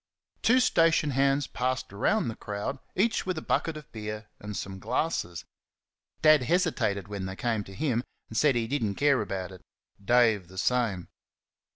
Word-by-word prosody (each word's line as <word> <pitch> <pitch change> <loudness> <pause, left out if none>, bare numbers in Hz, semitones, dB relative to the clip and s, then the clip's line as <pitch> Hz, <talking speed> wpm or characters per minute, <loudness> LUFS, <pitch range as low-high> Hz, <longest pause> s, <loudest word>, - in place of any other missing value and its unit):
Two 250 +2 +5
station 165 - +3
hands 135 +1 +2
passed 130 -2 -2
among 100 +4 +1
the 115 - -3
crowd, 105 +6 -4 0.2
each 220 0 +1
with 185 -3 -1
a - - -3
bucket 165 -2 0
of 150 - -12
beer 105 -1 -6
and 105 -1 -6
some 95 0 -5
glasses. 110 - -2 0.8
Dad 155 -2 +7
hesitated 120 - 0
when 100 -2 -4
they 95 - -6
came 115 -1 -1
to 95 - -11
him, 125 -4 0 0.2
and 110 - -10
said 145 +1 +4
he 115 -1 +1
did 135 +2 -1
n't 100 -2 -1
care 140 -3 +3
about 95 -2 -4
it. 95 - -12 0.4
Dave 110 -4 +3
the 95 +1 -14
same. 110 -7 0
120 Hz, 175 wpm, -28 LUFS, 100-145 Hz, 0.8 s, Dad